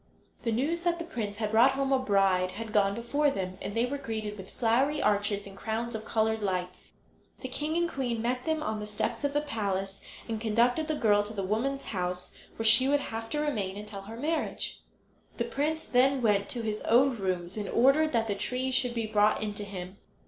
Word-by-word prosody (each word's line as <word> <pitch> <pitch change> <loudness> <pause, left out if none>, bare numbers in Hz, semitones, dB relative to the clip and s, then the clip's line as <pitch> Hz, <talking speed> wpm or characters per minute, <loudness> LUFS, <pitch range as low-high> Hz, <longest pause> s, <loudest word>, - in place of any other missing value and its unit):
The 230 - -1
news 290 +9 0
that 345 -1 +1
the 335 - -5
prince 210 -10 -4
had 215 -1 -2
brought 240 +5 +6
home 275 0 0
a 265 - +4
bride 195 -6 +2
had 225 0 -6
gone 200 -2 +3
before 285 +6 +1
them, 185 -7 -4
and 205 - -5
they 230 +1 +2
were 280 +3 -3
greeted 220 -5 -4
with 190 -2 -10
flowery 260 +6 +1
arches 205 -2 +1
and 195 -1 -11
crowns 225 +3 -3
of 220 0 -5
coloured 220 0 +1
lights. 185 -2 -3 0.5
The 260 - -4
king 300 +5 -2
and 345 0 +2
queen 250 -7 -2
met 250 +2 -1
them 315 -1 0
on 215 -4 -2
the 210 - -5
steps 210 +6 -3
of 285 0 0
the 295 - +2
palace, 195 -7 -3 0.3
and 225 -2 -3
conducted 240 +7 +2
the 310 - 0
girl 210 -6 +4
to 210 +1 -6
the 195 - -2
women's 245 +8 -1
house, 180 -2 -3 0.2
where 225 - -3
she 230 +4 +7
would 290 0 +4
have 225 -4 -5
to 300 - -1
remain 205 -10 -2
until 210 -1 -7
her 220 +4 -9
marriage. 310 +5 -2 0.6
The 235 - +1
prince 295 +6 -2
then 260 +1 +3
went 200 -2 +2
to 240 -2 -3
his 215 -1 -2
own 255 +2 +4
rooms 185 -2 -2
and 210 -2 -4
ordered 280 +6 +4
that 225 -1 +2
the 205 - 0
trees 255 +5 -2
should 250 -2 +1
be 230 -1 -1
brought 210 0 +2
in 210 -1 -2
to 205 - -5
him. 190 -1 -7
225 Hz, 220 wpm, -29 LUFS, 205-270 Hz, 0.6 s, she